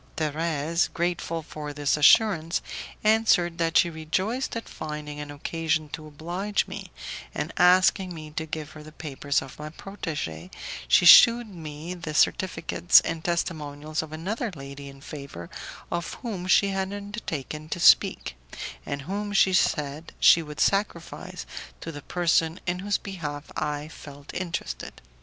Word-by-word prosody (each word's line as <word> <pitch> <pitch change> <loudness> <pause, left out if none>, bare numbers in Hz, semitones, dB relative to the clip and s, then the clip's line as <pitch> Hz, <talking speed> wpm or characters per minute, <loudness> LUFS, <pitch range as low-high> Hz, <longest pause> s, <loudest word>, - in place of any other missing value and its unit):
Thérèse, 160 +1 0
grateful 170 -1 -1
for 150 -1 -7
this 145 -1 +1
assurance, 165 +1 +4 0.4
answered 210 -6 +3
that 165 -1 +2
she 175 - +5
rejoiced 185 +12 -2
at 230 - -5
finding 150 -1 -6
an 150 0 -6
occasion 155 +1 -2
to 155 +1 -7
oblige 175 +7 -2
me, - - -7 0.5
and, - - -3
asking 185 +1 +4
me 155 -3 -8
to 160 +1 -4
give 155 -1 -5
her 155 - -11
the 155 +1 -12
papers 145 -3 -2
of 135 +1 -12
my 150 0 -6
protege, 150 - -6 0.4
she 65 - +5
shewed 235 +6 +9
me 160 -3 -7
the 170 -4 -6
certificates 175 0 +4
and 165 -1 -4
testimonials 155 -3 -2
of 160 -1 -9
another 200 +9 -3
lady 140 0 -8
in 135 0 -14
favour 140 - -9 0.4
of 170 - -3
whom 195 -7 -4
she 200 +1 +5
had 195 0 -2
undertaken 165 - -5
to 175 - -3
speak, 170 - +5 0.5
and 140 -1 -3
whom, 205 +6 -3
she 195 -1 +4
said, 150 -3 0
she 165 - +7
would 150 -2 -9
sacrifice 185 -2 -1 0.3
to 165 - -6
the 145 -2 -8
person 165 0 +1
in 180 0 -1
whose 205 +2 0
behalf 155 -7 -6
I 150 0 -2
felt 145 -2 -11
interested. 170 - -4
160 Hz, 145 wpm, -26 LUFS, 150-180 Hz, 0.5 s, shewed